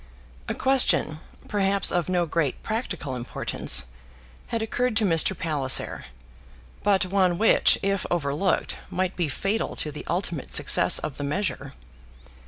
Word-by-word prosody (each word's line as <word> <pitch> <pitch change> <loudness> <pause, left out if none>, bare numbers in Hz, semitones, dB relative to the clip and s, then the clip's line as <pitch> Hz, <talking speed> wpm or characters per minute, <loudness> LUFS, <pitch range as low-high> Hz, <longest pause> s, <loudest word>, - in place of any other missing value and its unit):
A - - -2
question, 195 - +2 0.3
perhaps 200 -1 +1
of 175 0 -1
no 175 -1 +1
great 155 -3 -2
practical 200 - -4
importance, 120 - +1 0.6
had 230 -1 -2
occurred 245 +1 -1
to 220 - +2
Mr. 170 +1 +2
Palliser, 145 -5 +1 0.8
but 195 -2 +2
one 185 -2 +1
which, 225 - +4
if 195 -1 -1
overlooked, 165 +2 -1
might 185 0 -2
be 170 -4 -1
fatal 200 +9 -2
to 150 - -3
the 150 - -7
ultimate 170 -5 -3
success - - +5
of 145 - -4
the 145 - -4
measure. 185 +8 -3
180 Hz, 135 wpm, -25 LUFS, 155-200 Hz, 0.8 s, success